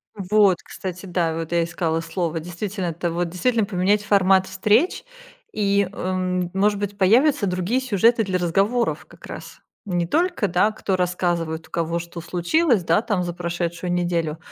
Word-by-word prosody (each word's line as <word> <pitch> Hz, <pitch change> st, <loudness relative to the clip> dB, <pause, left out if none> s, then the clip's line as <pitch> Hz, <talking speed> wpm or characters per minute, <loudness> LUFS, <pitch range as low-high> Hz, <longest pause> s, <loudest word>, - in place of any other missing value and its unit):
Вот, 200 Hz, -1 st, +3 dB
кстати, 185 Hz, 0 st, -7 dB
да. 175 Hz, -3 st, 0 dB
Вот 165 Hz, 0 st, -5 dB
я 170 Hz, -1 st, +2 dB
искала 165 Hz, -1 st, -1 dB
слово, 165 Hz, 0 st, -3 dB
действительно 180 Hz, +3 st, -4 dB
это 170 Hz, +1 st, -2 dB
вот, 175 Hz, 0 st, -1 dB
действительно 220 Hz, +6 st, +1 dB
поменять 200 Hz, +1 st, +1 dB
формат 195 Hz, -2 st, +4 dB
встреч 210 Hz, -, +1 dB, 0.5 s
и, 200 Hz, -2 st, +1 dB
эм, 185 Hz, -2 st, -2 dB
может 200 Hz, +1 st, +2 dB
быть, 205 Hz, 0 st, -4 dB
появятся 235 Hz, +6 st, +4 dB
другие 185 Hz, +7 st, 0 dB
сюжеты 230 Hz, -1 st, +3 dB
для 190 Hz, -2 st, -1 dB
разговоров 195 Hz, +8 st, 0 dB
как -, -, -16 dB
раз. -, -, -9 dB, 0.3 s
Не 175 Hz, -3 st, -1 dB
только, 335 Hz, -, +1 dB
да, 185 Hz, +4 st, +2 dB
кто 200 Hz, -2 st, -2 dB
рассказывает, 175 Hz, -3 st, -1 dB
у -, -, -31 dB
кого 170 Hz, 0 st, -1 dB
что 170 Hz, 0 st, -7 dB
случилось, 185 Hz, -, +1 dB
да, 165 Hz, +5 st, +2 dB
там 205 Hz, -6 st, -1 dB
за 175 Hz, -1 st, -4 dB
прошедшую 175 Hz, 0 st, -3 dB
неделю, 170 Hz, -3 st, -1 dB
185 Hz, 160 wpm, -22 LUFS, 170-205 Hz, 0.5 s, формат